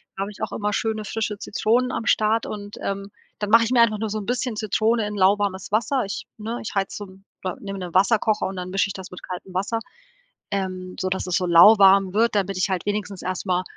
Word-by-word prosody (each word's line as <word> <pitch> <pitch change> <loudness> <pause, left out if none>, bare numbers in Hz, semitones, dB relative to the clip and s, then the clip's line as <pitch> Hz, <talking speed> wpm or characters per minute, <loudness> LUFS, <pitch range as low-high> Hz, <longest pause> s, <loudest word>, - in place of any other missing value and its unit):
da - - -5
habe 200 +2 -3
ich - - -14
auch - - -2
immer 210 0 -1
schöne, 220 0 -1
frische 215 -2 -3
Zitronen 240 +5 0
am 225 - -3
Start 220 +1 +2
und, 205 0 -7
ähm, 200 0 -4 0.3
dann 210 -1 -2
mache 230 +1 +6
ich 225 - -3
mir 245 -2 +5
einfach 215 -2 +3
nur 220 - -2
so 215 - -3
'n 205 - -7
bisschen 245 0 -2
Zitrone 220 +1 +1
in 210 - -4
lauwarmes 195 0 +1
Wasser. 235 +5 +1
Ich 195 - -5
ne, 225 +3 -4
ich 220 - -6
heize 195 -1 -1
so 205 - -6
'n 190 +1 -17 0.2
oder 185 - -3
nehme 195 -1 -6
'nen 180 -2 -6
Wasserkocher 210 +2 +3
und 190 - -6
dann 180 0 -5
mische 195 +1 +1
ich 200 - -5
das 190 -1 -9
mit 180 - -9
kaltem 185 +1 -7
Wasser, 200 +5 -1 0.7
ähm, 185 -2 -3
sodass 185 0 -1
es 180 - 0
so 185 - -1
lauwarm 195 +2 +7
wird, 225 +2 +2
damit 195 -1 0
ich 185 - +1
halt 185 -2 -2
wenigstens 205 -2 -3
erst 185 +1 -3
mal 180 -1 +1
200 Hz, 240 wpm, -23 LUFS, 190-215 Hz, 0.7 s, lauwarm